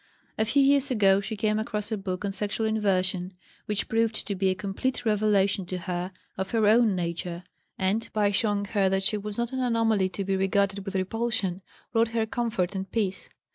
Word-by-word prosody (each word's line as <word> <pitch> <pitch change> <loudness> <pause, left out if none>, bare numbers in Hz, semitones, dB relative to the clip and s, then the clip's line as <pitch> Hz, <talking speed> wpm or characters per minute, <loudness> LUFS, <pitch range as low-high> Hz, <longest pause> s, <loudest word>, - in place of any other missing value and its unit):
A 220 - +1
few 275 +5 +3
years 280 0 +4
ago 200 -5 +4
she 215 +2 -4
came 215 0 +1
across 215 -1 -3
a - - +1
book 195 -1 -4
on 200 - -1
sexual 205 +2 -2
inversion 185 -4 0 0.3
which 210 -1 -1
proved 225 -1 +1
to 205 - -2
be 190 0 +1
a 185 - +1
complete 210 +7 -2
revelation 205 -2 +2
to 185 - -3
her 180 +1 -3 0.3
of 190 - -2
her 225 -2 +2
own 220 -1 +5
nature, 170 0 -3 0.3
and, 200 +4 0
by 210 -1 +2
showing 205 0 +1
her 195 -2 +1
that 195 0 0
she 210 - +1
was 210 0 -5
not 235 +1 -2
an 260 - -2
anomaly 225 -6 +2
to 195 - -4
be 195 0 +1
regarded 195 +1 +1
with 195 -1 -5
repulsion, 195 -1 -1 0.3
brought 230 0 +4
her 220 - +2
comfort 220 -6 -1
and 190 -1 -5
peace. 195 -4 -2
205 Hz, 200 wpm, -27 LUFS, 190-225 Hz, 0.3 s, own